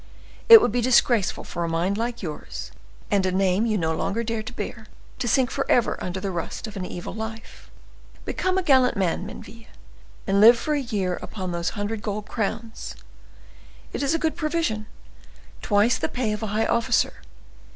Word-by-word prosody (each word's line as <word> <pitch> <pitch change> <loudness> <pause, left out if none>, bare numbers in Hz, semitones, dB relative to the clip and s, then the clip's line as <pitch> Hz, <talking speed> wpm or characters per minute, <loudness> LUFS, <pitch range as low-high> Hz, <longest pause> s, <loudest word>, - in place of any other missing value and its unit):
"It 455 -1 +13
would - - +2
be 245 +2 0
disgraceful 235 -4 +3
for 170 - -4
a 170 - -1
mind 170 +4 0
like 235 +1 -3
yours, 155 -4 -6 0.4
and 200 -2 +3
a 185 - +1
name 190 +3 +2
you 215 -2 +1
no 160 -3 0
longer 225 +7 -1
dare 225 -1 -2
to 220 - -7
bear, 220 -2 -6 0.3
to 240 - -2
sink 255 +1 +2
forever 260 -3 +1
under 180 +1 -3
the 195 0 -3
rust 170 +5 -4
of 215 -1 -9
an 185 -2 -4
evil 175 - -6
life. 220 +1 -8 0.6
Become 370 0 -1
a 380 - +1
gallant 260 -8 +4
man, 185 0 0
Menneville, 225 +2 -11 0.6
and 200 -1 +2
live 235 +3 +9
for 300 +6 -2
a 290 - 0
year 195 -7 -2
upon 185 -4 -5
those 170 +4 -3
hundred 205 +1 -3
gold 210 0 -4
crowns: 225 +1 -4 1.0
it - - -3
is 280 +3 +1
a - - +3
good 320 -1 -1
provision; 305 -10 -1 0.7
twice 210 +3 +2
the - - -1
pay 245 -4 -1
of 210 - -3
a 220 - -2
high 215 +2 0
officer. 235 0 +1
220 Hz, 185 wpm, -24 LUFS, 195-240 Hz, 1.0 s, It